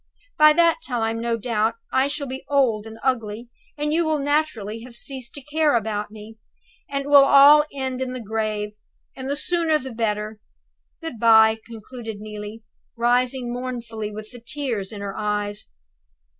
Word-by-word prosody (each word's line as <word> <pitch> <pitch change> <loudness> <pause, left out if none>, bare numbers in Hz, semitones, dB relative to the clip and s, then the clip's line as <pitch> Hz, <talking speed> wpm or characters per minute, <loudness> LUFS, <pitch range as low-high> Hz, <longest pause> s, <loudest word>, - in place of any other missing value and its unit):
By 305 0 +7
that 335 +5 +4
time, 230 -2 -1
no 235 0 0
doubt, 225 0 0 0.2
I 260 +1 +3
shall 285 0 -3
be 265 0 -6
old 240 -7 +2
and 220 0 -10
ugly, 235 -3 -1 0.3
and 300 +1 -1
you 335 +2 +3
will 315 -1 +1
naturally 280 -7 -1
have 240 0 -12
ceased 260 -1 -7
to 285 - -9
care 300 -1 +2
about 210 -2 -1
me, 215 +1 -12 0.5
and 275 0 -2
it - - -9
will 285 -1 +8
all 285 +2 +8
end 260 -2 -3
in 260 -1 -2
the 255 - -5
grave, 215 -1 -2 0.4
and 260 0 -6
the 285 - 0
sooner 330 0 +1
the 265 -3 -7
better. 215 -1 -2 0.6
Good 325 -9 -6
by," 220 -1 +6
concluded 225 -1 -8
Neelie, 210 +1 -8 0.3
rising 245 +1 +1
mournfully, 235 -4 -5
with 215 +1 -9
the 245 -2 -12
tears 235 -7 -3
in 205 -2 -7
her 200 -1 -5
eyes. 205 -1 -2
235 Hz, 170 wpm, -23 LUFS, 215-275 Hz, 0.6 s, will